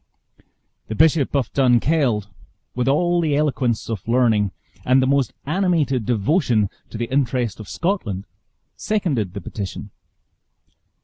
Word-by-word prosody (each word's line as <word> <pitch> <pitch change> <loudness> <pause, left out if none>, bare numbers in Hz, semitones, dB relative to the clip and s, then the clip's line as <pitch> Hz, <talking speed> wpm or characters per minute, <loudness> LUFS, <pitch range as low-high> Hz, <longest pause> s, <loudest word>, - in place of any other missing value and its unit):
The 110 - -4
Bishop 155 0 +3
of 135 -5 0
Dunkeld, 125 -4 +2 0.5
with 125 0 -1
al 175 +5 +2
the 155 -3 +1
eloquence 135 -6 0
of 110 -4 -5
learning 115 -5 +2 0.3
and 130 +1 +4
the 130 - +3
most 135 -2 +2
animated 155 - 0
devotion 115 - +1 0.2
to - - -7
the 120 - -1
interest 125 -5 0
of 110 - -9
Scotland, 130 - -2 0.5
seconded 140 - -1
the 100 - -5
petition. 100 +2 -6
125 Hz, 125 wpm, -21 LUFS, 110-150 Hz, 0.5 s, and